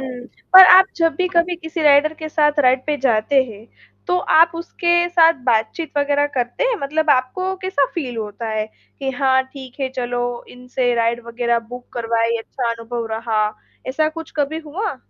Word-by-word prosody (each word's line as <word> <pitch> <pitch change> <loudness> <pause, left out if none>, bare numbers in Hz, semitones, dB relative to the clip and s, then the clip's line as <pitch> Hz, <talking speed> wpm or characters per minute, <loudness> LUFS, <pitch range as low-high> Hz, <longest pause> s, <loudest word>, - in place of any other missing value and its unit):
हुँ। 255 -2 -7 0.3
पर 375 0 +11
आप 380 0 +6
जब 330 -1 +1
भी 365 -1 0
कभी 350 0 +1
किसी 325 0 -5
राइडर 295 +1 +4
के 315 0 -7
साथ 295 -1 +1
राइड 255 0 +2
पे 300 -1 0
जाते 260 +2 +2
हैं 220 -2 -12 0.4
तो 360 - +1 0.2
आप 330 +1 +6
उसके 345 +1 0
साथ 335 -2 +5
बातचीत 235 +7 0
वगैरह 285 0 +1
करते 245 - -2
हैं? - - +1
मतलब 310 +2 0
आपको 370 +10 0
कैसा 285 -8 +1
फील 255 -8 -4
होता 220 +1 -5
है 215 0 -2 0.3
कि 270 -1 -3
हाँ 260 0 +2
ठीक 265 -1 -11
है 265 - -1
चलो 245 -1 -2 0.3
इनसे 250 0 -2
राइड 235 0 0
वगैरह 235 0 -1
बुक 245 0 -9
करवाइए 230 0 -1
अच्छा 235 +1 -4
अनुभव 230 0 -5
रहा। 225 -1 -1 0.5
ऐसा 310 +4 0
कुछ 325 0 -9
कभी 300 +2 -1
हुआ? 355 -2 -4
270 Hz, 180 wpm, -19 LUFS, 240-320 Hz, 0.5 s, पर